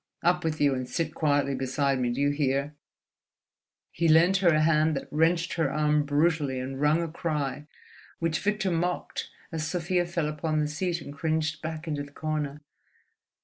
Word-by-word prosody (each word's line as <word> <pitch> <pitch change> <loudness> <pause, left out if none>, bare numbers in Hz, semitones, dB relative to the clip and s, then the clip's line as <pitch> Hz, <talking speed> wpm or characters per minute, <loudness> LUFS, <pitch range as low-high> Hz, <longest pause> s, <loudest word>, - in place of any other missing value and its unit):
Up 175 +1 +2
with 160 -1 -1
you 145 -2 +4
and 130 -1 -4
sit 160 -2 -2
quietly 145 -3 +1
beside 135 +1 0
me—do 120 0 -1
you 145 0 +3
hear?" 140 0 0 1.2
He 170 - 0
lent 165 +4 +5
her 185 -1 +2
a 155 -2 +3
hand 155 0 +3
that - - -4
wrenched 165 +3 +2
her 160 -5 0
arm 150 0 +2
brutally 145 -2 +1
and 135 +2 -5
wrung 155 +3 +3
a - - -2
cry 150 -3 -3 0.5
which 165 -1 0
Victor 210 -2 0
mocked 175 +2 -2 0.2
as 155 -2 -2
Sofia 175 +1 0
fell 170 -3 -1
upon 155 +1 -1
the 150 - +1
seat 170 +3 -2
and 145 - -8
cringed 155 0 -1
back 160 +1 -5
into 150 -2 -2
the 145 0 -9
corner. 150 -2 -3
155 Hz, 175 wpm, -27 LUFS, 145-165 Hz, 1.2 s, lent